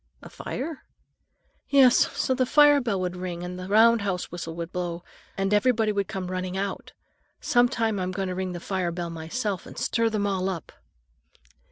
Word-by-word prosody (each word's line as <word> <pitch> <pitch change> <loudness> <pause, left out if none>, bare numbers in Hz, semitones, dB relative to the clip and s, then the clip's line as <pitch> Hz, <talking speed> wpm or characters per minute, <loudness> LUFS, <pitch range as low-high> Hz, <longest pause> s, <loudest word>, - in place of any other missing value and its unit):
"A - - -11
fire?" 305 +1 -5 0.9
"Yes, 265 -3 +5
so 275 -2 +1
the 255 -1 +1
fire 290 0 +6
bell 225 -6 -1
would 180 -1 -2
ring 180 -1 -5
and 180 +1 -6
the 185 - -6
roundhouse 205 -3 +3
whistle 165 -2 -6
would 170 0 -5
blow, 175 -1 -4 0.3
and 195 +1 0
everybody 220 0 +3
would 200 -2 -1
come 185 -1 -5
running 185 0 -3
out. 195 0 -4 0.5
Sometime 240 -6 +2
I'm 185 0 -2
going 190 +1 -2
to 185 - -3
ring 185 0 -3
the 175 - -5
fire 185 -1 -2
bell 170 0 -4
myself 180 +5 -3
and - - -12
stir 230 -1 +1
them 210 -2 -1
all 195 -1 0
up." 175 -5 -6
195 Hz, 180 wpm, -26 LUFS, 180-230 Hz, 0.9 s, fire